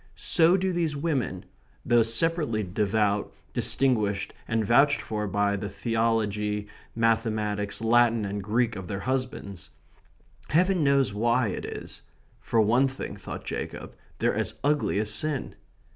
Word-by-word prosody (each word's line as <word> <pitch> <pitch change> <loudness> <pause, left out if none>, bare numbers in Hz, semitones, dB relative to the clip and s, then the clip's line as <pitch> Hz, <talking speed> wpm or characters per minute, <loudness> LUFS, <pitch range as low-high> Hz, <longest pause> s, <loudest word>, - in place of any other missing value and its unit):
So 170 +2 +4
do 190 0 -1
these 165 -4 0
women 140 - -2 0.4
though 120 -1 +4
separately 115 0 +1
devout, 105 +2 0 0.2
distinguished, 105 -7 +1
and 115 -2 0
vouched 140 +7 +4
for 105 -1 -3
by 100 0 +1
the 100 0 -4
theology, 105 -1 -1 0.3
mathematics, 110 -3 0
Latin, 115 -1 +3
and 100 +1 -3
Greek 115 +3 0
of 95 -2 -7
their 100 +1 -4
husbands. 130 - -3 0.8
Heaven 180 +1 +3
knows 140 -6 +3
why 120 +2 +2
it - - -4
is. - - -8 0.4
For 115 - 0
one 120 +6 +3
thing, 135 0 -6
thought - - -8
Jacob, - - -6 0.2
they're - - +1
as - - -1
ugly 145 -7 +1
as 105 0 0
sin. 145 +4 -2
115 Hz, 135 wpm, -27 LUFS, 105-135 Hz, 0.8 s, So